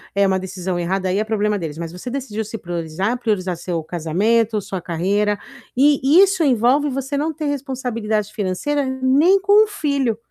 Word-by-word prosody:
é 200 - +4
uma 190 -1 +1
decisão 185 -1 -4
errada, 185 +2 -1
aí 190 - +1
é 215 - +1
problema 210 -1 0
deles, 160 -2 -5
mas 165 -1 -5
você 180 +8 -7
decidiu 235 -5 -4
se 225 +2 -6
priorizar, 175 +5 -3
priorizar 190 -6 -1
seu 170 -2 -3
casamento, 205 +8 +1
sua 190 -2 -5
carreira 200 +5 0 0.4
e 280 +3 +4
isso 385 -4 +2
envolve 265 +3 +3
você 270 +2 -3
não 305 +3 0
ter 310 0 -5
responsabilidade 245 -7 -2
financeira 220 +9 -1
nem 265 +9 +3
com 410 +3 +5
o - - -11
filho. 280 - -1
220 Hz, 175 wpm, -20 LUFS, 185-275 Hz, 0.4 s, com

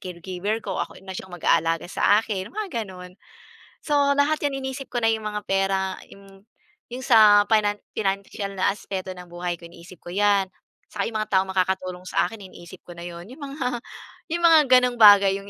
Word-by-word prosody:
caregiver 185 +4 -4
ko. - - -4
Ako - - -9
na 190 -1 -7
siyang 185 - -9
mag-aalaga 165 -1 +1
sa 205 +1 +3
akin, 200 -3 -5
mga 380 - -4
ganun. 180 -1 -11 0.7
So 285 -1 +2
lahat 300 +2 +2
yan 275 -1 -1
iniisip 265 +1 -6
ko 240 - -1
na 225 - +4
yung 220 -1 -3
mga 210 0 -4
pera, 195 -1 0
im 195 0 -16 0.5
yung 255 +1 -6
sa 215 -4 +7
finan 205 -2 +2 0.2
financial 200 0 -3
na 185 - +1
aspeto 190 -2 -6
ng 180 - -10
buhay 175 0 -3
ko 170 - -12
iniisip 175 +1 -14
ko 175 - -8
yan. 200 -1 +2 0.5
Tsaka 200 -2 -2
yung 220 - -4
mga 215 - -3
taong 190 0 +2
makakatulong 185 -1 -2
sa - - +1
akin, 225 - -10
iniisip 175 +1 -13
ko 175 - -10
na - - -8
yun. 170 0 -8
Yung 280 +4 -13
mga 265 -4 -4 0.5
yung 345 0 -2
mga 325 -2 +8
gano’ng 250 -1 +4
bagay 200 -2 +8
yung 200 - -13
200 Hz, 195 wpm, -24 LUFS, 185-230 Hz, 0.7 s, mga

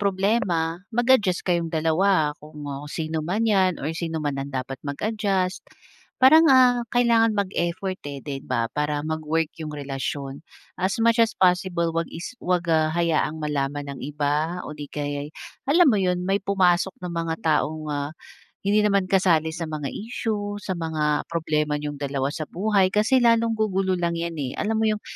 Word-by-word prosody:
problema, 190 -4 0
mag-adjust 235 -7 +2
kayong 170 -2 +1
dalawa, 160 0 +2
kung 150 -1 -10 0.2
sino 160 0 -3
man 200 +8 0
yan, 190 -5 +3
or - - -4
sino 165 -1 -3
man 145 -2 -2
ang 140 - -7
dapat 135 0 -4
mag-adjust, 190 +4 -1 0.6
parang, 315 +5 +7
ah, 250 -2 +5
kailangan 230 -2 +4
mag-effort, 185 -2 -2
eh, 140 - -6
'di 140 -2 -5
ba, 115 0 -1
para 150 0 0
mag-work 160 0 -1
yung 155 - -5
relasyon. 140 0 -5 0.3
As 190 +3 -1
much 230 +1 +4
as 225 - +2
possible, 180 -2 +2
huwag 165 0 -1
is 175 +9 -7
huwag, 180 -1 0
ah, 160 -1 +3
hayaang 160 -2 0
malaman 145 -1 -2
ng - - -10
iba 150 +4 -1
o 150 - -7
'di 145 -1 -8
kaya'y, 145 0 -4 0.4
alam 350 +4 +6
mo 220 - +4
yun, 180 0 0
may 195 +1 +1
pumasok 190 -1 +2
na 180 - -5
mga 165 -1 -2
taong, 155 0 +1
ah, 145 0 -2 0.5
hindi 205 +2 +3
naman 200 -2 +1
kasali 170 -5 +3
sa 165 +1 -5
mga 150 -3 -4
issue, 210 -2 -3
sa 190 - -3
mga 155 -2 -1
problema 155 -3 -1
niyong 145 -1 -5
dalawa 140 -1 -2
sa 155 +1 -5
buhay, 195 +1 +2
kasi 215 +5 +4
lalong 230 -1 +3
gugulo 190 -3 +1
lang 170 -1 0
yan, 170 0 -3
eh, 130 -3 -3
alam 220 +1 -1
mo 220 - +2
yung, 215 0 -1
170 Hz, 170 wpm, -24 LUFS, 150-200 Hz, 0.6 s, parang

